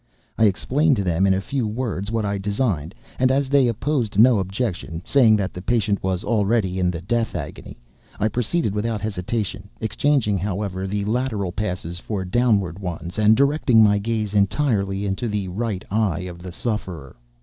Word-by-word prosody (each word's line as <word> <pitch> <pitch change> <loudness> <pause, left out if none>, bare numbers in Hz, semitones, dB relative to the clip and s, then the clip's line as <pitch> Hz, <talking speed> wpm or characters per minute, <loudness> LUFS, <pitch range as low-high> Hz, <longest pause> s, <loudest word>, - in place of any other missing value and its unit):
I 110 - +4
explained 135 +9 +2
to 100 - -1
them, 90 +1 +2
in 95 - +4
a - - 0
few 130 +1 -2
words, 105 -3 -3
what 110 -1 -1
I 100 0 -1
designed, 100 - -1 0.2
and 130 0 +4
as 135 0 +1
they 140 -2 +4
opposed 120 -2 -1
no 115 0 +6
objection, 95 -4 -3
saying 120 -6 +5
that 95 -3 -2
the 90 - -7
patient 105 -1 0
was 95 -1 -1
already 105 -4 +1
in 90 -1 +2
the 85 -1 -4
death 115 +3 -1
agony, 75 -6 -7 0.4
I 105 - +2
proceeded 120 - -1
without 110 +1 -1
hesitation—exchanging, 105 +3 -1
however, 95 0 -3
the 100 +1 -2
lateral 110 -4 -1
passes 90 -3 -4
for 95 -1 -4
downward 100 -4 +1
ones, 90 0 -5
and 110 +1 +5
directing 140 -4 +4
my 105 -1 +4
gaze 110 -1 -2
entirely 100 -1 +1
into 100 +5 -2
the 105 -3 -2
right 105 0 -3
eye 100 -6 +1
of 90 -1 -7
the 90 0 -7
sufferer. 90 - -4
105 Hz, 170 wpm, -22 LUFS, 95-115 Hz, 0.4 s, no